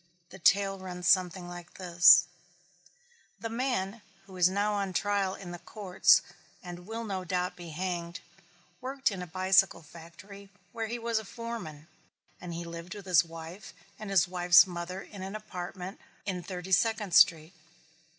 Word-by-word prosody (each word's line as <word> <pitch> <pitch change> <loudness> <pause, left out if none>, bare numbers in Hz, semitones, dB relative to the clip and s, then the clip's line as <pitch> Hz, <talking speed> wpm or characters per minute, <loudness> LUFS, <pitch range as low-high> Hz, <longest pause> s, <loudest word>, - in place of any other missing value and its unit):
The 190 - -11
tale 195 +2 +3
runs 180 -1 -5
something 185 -1 +2
like 175 0 -10
this 175 -1 +6 1.1
The 225 - -5
man, 230 -4 -2 0.2
who 190 -1 -13
is 180 -1 +4
now 205 +2 0
on 200 -2 -2
trial 200 -1 0
in 180 -3 -9
the 175 - -7
courts 195 -2 +3 0.4
and 175 0 -9
will 225 +1 -5
no 195 -4 -4
doubt 180 0 -2
be 175 -2 -10
hanged, 175 +1 -4 0.6
worked 265 0 -1
in 190 -2 -5
a 180 - -6
bicycle 185 0 +2
factory 170 +5 -13 0.2
where 225 -1 -4
he 235 +2 -4
was 230 -1 -1
a - - -8
foreman, 195 -10 -7 0.5
and 175 -1 -7
lived 170 +3 -8
with 205 -2 -10
his 175 -4 +5
wife 165 +4 -10 0.2
and 215 -1 -7
his 190 -2 +3
wife's 175 -1 +6
mother 180 +1 -6
in 200 - -11
an 190 +2 -6
apartment 185 -2 -7 0.3
in 185 -3 -3
Thirty 180 0 -7
Second 210 0 +1
Street. 165 0 +5
185 Hz, 160 wpm, -29 LUFS, 175-200 Hz, 1.1 s, this